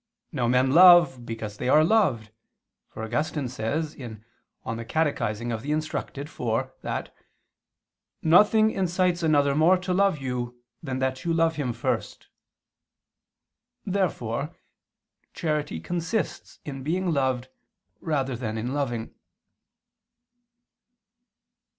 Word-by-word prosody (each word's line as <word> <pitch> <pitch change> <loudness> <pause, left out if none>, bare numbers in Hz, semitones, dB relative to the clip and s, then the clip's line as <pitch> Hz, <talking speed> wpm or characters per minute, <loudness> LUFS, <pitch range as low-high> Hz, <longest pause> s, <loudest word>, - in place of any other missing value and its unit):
Now 125 -8 -1
men 125 +2 +3
love 170 -7 +7
because 110 -2 -6
they 125 - -2
are 155 +3 +6
loved, 150 - +2 0.6
for 110 - -8
Augustine 145 +4 -2
says 140 +7 -3
(De 120 -5 -8 0.5
Catech. 115 +7 -1
Rud. 120 +9 -3
iv) 130 -3 -3
that - - -4 1.1
"nothing 210 +6 +5
incites 180 -2 0
another 145 -3 +3
more 160 +5 +4
to 180 0 -3
love 195 -2 +3
you 125 -2 -4 0.2
than 135 -5 -4
that 130 +2 -2
you 170 - -1
love 165 -1 +2
him 135 -5 -1
first." 120 +1 -3 1.6
Therefore 150 - -2 0.8
charity 150 - -2
consists 175 - -3
in 135 -2 -6
being 175 +5 -1
loved 130 -3 0 0.5
rather 135 -5 -1
than 110 -2 -4
in 120 +4 -3
loving. 120 -6 -3
140 Hz, 105 wpm, -26 LUFS, 120-165 Hz, 1.6 s, love